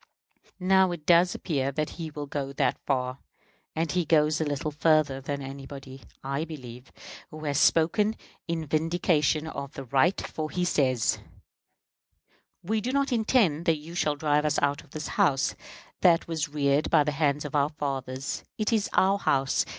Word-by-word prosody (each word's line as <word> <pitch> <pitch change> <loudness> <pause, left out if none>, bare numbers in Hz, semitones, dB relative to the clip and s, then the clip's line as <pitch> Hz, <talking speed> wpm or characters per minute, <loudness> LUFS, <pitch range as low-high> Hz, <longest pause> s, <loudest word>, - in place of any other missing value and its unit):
Now, 190 0 +4
it 165 -3 -7
does 175 +1 +4
appear 140 -5 -1
that 155 +2 -2
he 165 -2 -6
will 150 -1 -6
go 140 -1 -4
that - - 0
far; 130 -1 -1 0.6
and 160 -1 -1
he 180 -1 +1
goes 155 0 +2
a - - +3
little 145 0 -2
further 150 -3 +2
than 140 +1 -4
anybody, 135 0 -9 0.2
I 140 +3 -2
believe, 130 -6 -9 0.4
who 155 0 -10
has 145 -1 +1
spoken 205 +7 +3 0.3
in 165 -2 -2
vindication 155 0 +1
of 140 -3 -6
the 135 - -7
right, 140 +8 +2
for 155 -1 -4
he 180 +1 -1
says: 130 -8 +1 1.4
"We 215 +5 0
do 250 - -2
not 280 0 +1
intend 215 - +2
that 165 -2 +3
you 155 +3 -11
shall 155 -4 0
drive 150 0 +1
us 150 -1 +1
out 145 +1 0
of 150 - -22
this 155 +2 -6
House 135 -1 +2 0.5
that 170 -1 +4
was 160 -3 -2
reared 145 0 +1
by 150 - +5
the 150 - -1
hands 145 0 0
of 145 - -6
our 145 0 +2
fathers. 135 -3 -4
It 215 +1 0
is 215 -3 +1
our 195 +1 +3
House. 135 -6 +1
150 Hz, 175 wpm, -27 LUFS, 140-170 Hz, 1.4 s, by